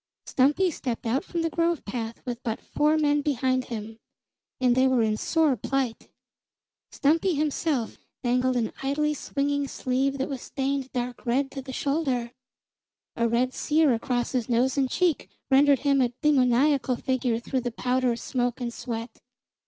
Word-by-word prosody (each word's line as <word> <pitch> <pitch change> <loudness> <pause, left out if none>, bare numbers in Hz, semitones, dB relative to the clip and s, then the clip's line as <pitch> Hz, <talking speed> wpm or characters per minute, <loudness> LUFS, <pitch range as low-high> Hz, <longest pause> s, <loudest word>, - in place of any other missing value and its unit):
Stumpy 295 +8 +2
stepped 245 -5 -4
out 240 +4 0
from 335 -1 -3
the 330 - +1
grove 335 -1 0
path 225 +1 -5
with 240 -1 -4
but 225 -4 -3
four 300 +1 +1
men 295 -1 +2
behind 260 -2 0
him; 220 -1 -7 0.6
and 250 -2 +3
they 260 +1 +4
were 255 -3 +3
in 215 -1 +1
sore 315 +3 +2
plight. 265 -3 -2 0.8
Stumpy 325 +5 +2
himself 295 -4 -1 0.2
dangled 250 +1 +2
an 230 -3 -1
idly 300 +2 0
swinging 285 0 -1
sleeve 265 +2 -1
that 270 - -1
was 270 -3 -5
stained 270 -1 -2
dark 245 -1 -4
red 270 +3 +1
to 270 - -6
the 260 0 -8
shoulder. 265 -4 -1 0.8
A 235 - +1
red 250 +3 +1
sear 305 -3 +2
across 240 +1 -1
his 250 -2 -1
nose 245 +2 +2
and 270 -2 +1
cheek 345 -1 0 0.2
rendered 275 -1 +5
him 280 -1 +3
a 245 - +3
demoniacal 265 -1 +3
figure 250 -2 0
through 255 +2 -2
the 245 - -2
powder, 250 0 0
smoke 245 0 -2
and 240 -2 -3
sweat. 230 -1 -6
260 Hz, 160 wpm, -26 LUFS, 245-285 Hz, 0.8 s, rendered